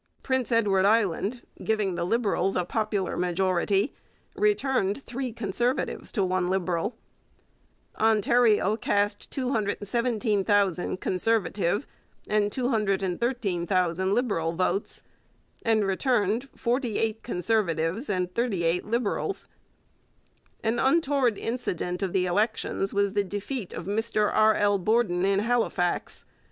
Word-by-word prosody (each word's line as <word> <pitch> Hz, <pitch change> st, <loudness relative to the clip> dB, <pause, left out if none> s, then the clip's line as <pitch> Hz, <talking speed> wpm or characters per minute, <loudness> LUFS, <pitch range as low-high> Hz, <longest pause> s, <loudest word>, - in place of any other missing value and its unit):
Prince 260 Hz, -2 st, 0 dB
Edward 205 Hz, -5 st, +3 dB
Island, 210 Hz, +2 st, +1 dB, 0.2 s
giving 215 Hz, -4 st, 0 dB
the 170 Hz, -, -2 dB
Liberals 200 Hz, -1 st, +1 dB
a 180 Hz, -, 0 dB
popular 210 Hz, -1 st, -1 dB
majority, 185 Hz, -, +1 dB, 0.4 s
returned 275 Hz, -, +1 dB
three 250 Hz, +1 st, -4 dB
Conservatives 235 Hz, +3 st, -2 dB
to 205 Hz, -, +1 dB
one 185 Hz, -1 st, 0 dB
Liberal. 185 Hz, +2 st, -1 dB, 1.0 s
Ontario 220 Hz, -1 st, +3 dB
cast 205 Hz, -1 st, 0 dB
217,000 205 Hz, -5 st, 0 dB
Conservative 200 Hz, +1 st, 0 dB, 0.4 s
and 210 Hz, -1 st, +1 dB
213,000 195 Hz, -5 st, 0 dB
Liberal 200 Hz, -10 st, 0 dB
votes 185 Hz, +3 st, -2 dB, 0.6 s
and 220 Hz, -2 st, +2 dB
returned 225 Hz, +4 st, 0 dB
forty 240 Hz, -2 st, -1 dB
eight 225 Hz, 0 st, -1 dB
Conservatives 185 Hz, -, -1 dB
and 180 Hz, -2 st, -1 dB
thirty 225 Hz, -6 st, 0 dB
eight 170 Hz, +2 st, +1 dB
Liberals. 235 Hz, -, -1 dB, 1.2 s
An 230 Hz, +1 st, 0 dB
untoward 270 Hz, -5 st, +2 dB
incident 180 Hz, -7 st, -3 dB
of 195 Hz, -2 st, -1 dB
the 185 Hz, 0 st, +1 dB
elections 205 Hz, +1 st, 0 dB
was 200 Hz, -1 st, +1 dB
the 205 Hz, -1 st, +2 dB
defeat 205 Hz, +3 st, -5 dB
of 165 Hz, -, -6 dB
Mr 215 Hz, +1 st, 0 dB
R. 215 Hz, 0 st, +5 dB
L. 205 Hz, -1 st, +2 dB
Borden 190 Hz, -2 st, +1 dB
in 195 Hz, 0 st, +2 dB
Halifax. 225 Hz, -6 st, -1 dB
205 Hz, 110 wpm, -27 LUFS, 185-235 Hz, 1.2 s, R